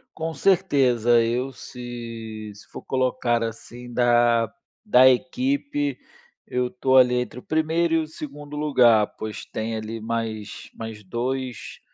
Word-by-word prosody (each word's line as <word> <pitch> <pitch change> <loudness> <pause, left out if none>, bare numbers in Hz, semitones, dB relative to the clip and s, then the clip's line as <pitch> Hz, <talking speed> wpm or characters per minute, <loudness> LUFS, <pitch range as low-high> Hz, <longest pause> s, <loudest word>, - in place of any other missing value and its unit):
Com 160 0 -3
certeza, 135 - +3
eu 125 +4 -1
se 115 -4 -8
se 105 - -15
for - - -9
colocar, 125 -2 0
assim, 120 +2 -7
da 120 -2 +3 0.3
da 130 - +6
equipe. 280 - 0 0.5
Eu 125 0 -1
tô 130 +1 +1
ali 125 -1 +6
entre 125 -1 -2
o - - -15
1° 160 +1 +1
e - - +4
o 155 - -3
2° 150 -1 -9
lugar, 120 -8 +4
pois 110 -1 -6
tem 110 +1 -4
ali 110 +1 -5
mais 110 -2 -4
mais 110 -2 -8
2, 125 +4 -4
125 Hz, 135 wpm, -24 LUFS, 115-145 Hz, 0.5 s, da